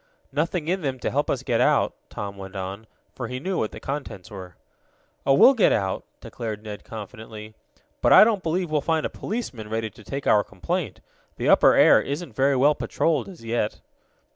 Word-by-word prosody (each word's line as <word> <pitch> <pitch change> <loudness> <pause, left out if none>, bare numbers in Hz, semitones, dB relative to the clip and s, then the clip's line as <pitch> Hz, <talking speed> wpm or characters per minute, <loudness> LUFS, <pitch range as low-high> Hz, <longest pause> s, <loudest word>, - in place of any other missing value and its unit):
"Nothing 155 +3 -1
in 185 +2 0
them 135 -4 -2
to - - -1
help 145 +2 0
us - - -1
get - - +1
out," - - +3 0.2
Tom 100 -1 -6
went 95 0 -10
on, 95 +3 -6 0.3
for 125 - -5
he 125 +1 -5
knew 185 +6 -2
what 110 - -1
the - - -9
contents 135 -8 -6
were. 95 -3 -9 0.7
"Oh, 135 - +6
we'll 265 - +8
get 230 -7 +4
out," 95 -2 0 0.2
declared 110 -2 -6
Ned 105 -1 -8
confidently, 110 0 -9 0.5
"but - - +3
I - - +10
don't 215 -3 +2
believe 170 0 -1
we'll 150 -1 +1
find 160 +1 0
a - - -3
policeman 135 - -5
ready 110 0 -2
to 110 - -16
take 140 +5 -5
our 105 -1 +4
complaint. 90 -6 -4 0.4
The - - 0
upper - - +6
air - - +6
isn't 145 -2 -5
very 135 +1 +3
well 140 +4 +4
patrolled 160 +2 -1
as 170 -11 -12
yet." 115 -2 -1
125 Hz, 195 wpm, -24 LUFS, 105-155 Hz, 0.7 s, I